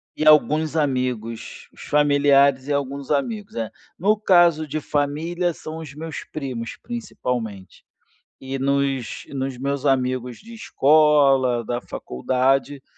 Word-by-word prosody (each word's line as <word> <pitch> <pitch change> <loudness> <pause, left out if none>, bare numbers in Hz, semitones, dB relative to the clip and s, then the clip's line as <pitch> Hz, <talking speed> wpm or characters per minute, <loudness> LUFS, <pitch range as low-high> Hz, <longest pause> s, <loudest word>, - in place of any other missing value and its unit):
E 155 - -2
alguns 155 +1 +4
amigos, 125 -6 -2
os - - -14
familiares 140 -2 +3
e 145 - 0
alguns 140 -1 -3
amigos, 210 +8 -2
é. 110 -2 -3 0.3
No 210 +5 +2
caso 175 -6 +4
de 155 +1 -3
família, 160 +5 -1
são 155 +1 -8
os 155 -4 -8
meus 160 +1 -7
primos, 130 -6 -6
principalmente. 125 - -5 0.5
E 135 0 -5
nos 140 -2 -1
nos 135 -2 -4
meus 140 +2 -3
amigos 130 -2 0
de 230 +2 -13
escola, 140 - +3
da 120 +2 -3
faculdade, 130 - -1
140 Hz, 125 wpm, -22 LUFS, 130-155 Hz, 0.5 s, alguns